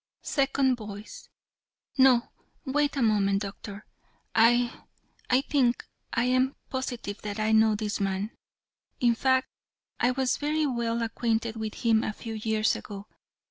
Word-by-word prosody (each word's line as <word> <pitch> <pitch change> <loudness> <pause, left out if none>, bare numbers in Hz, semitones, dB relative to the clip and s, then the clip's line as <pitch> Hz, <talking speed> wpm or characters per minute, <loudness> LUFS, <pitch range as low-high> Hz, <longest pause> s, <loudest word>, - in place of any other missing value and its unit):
SECOND 270 -2 +1
VOICE: 210 -1 -9 0.7
"No, 260 -3 +5 0.4
wait 290 +1 0
a 265 - +2
moment, 200 -2 +2
Doctor. 200 +1 -8 0.5
I 240 +2 +3 0.5
I 255 +1 +4
think 260 -4 +1 0.3
I 230 - +1
am 255 +2 +2 0.2
positive 245 -6 -4
that 210 0 -5
I 215 0 +1
know 220 0 +5
this 210 -1 -3
man. 195 +2 -1 0.7
In 240 -1 +4
fact, 260 +2 +2 0.5
I 245 - +3
was 255 0 0
very 305 +1 0
well 235 -3 -1
acquainted 225 0 -1
with 220 +1 -6
him 225 -1 +4
a 215 - -2
few 225 +2 -7
years 220 0 +1
ago. 200 -1 -8
230 Hz, 140 wpm, -27 LUFS, 215-260 Hz, 0.7 s, No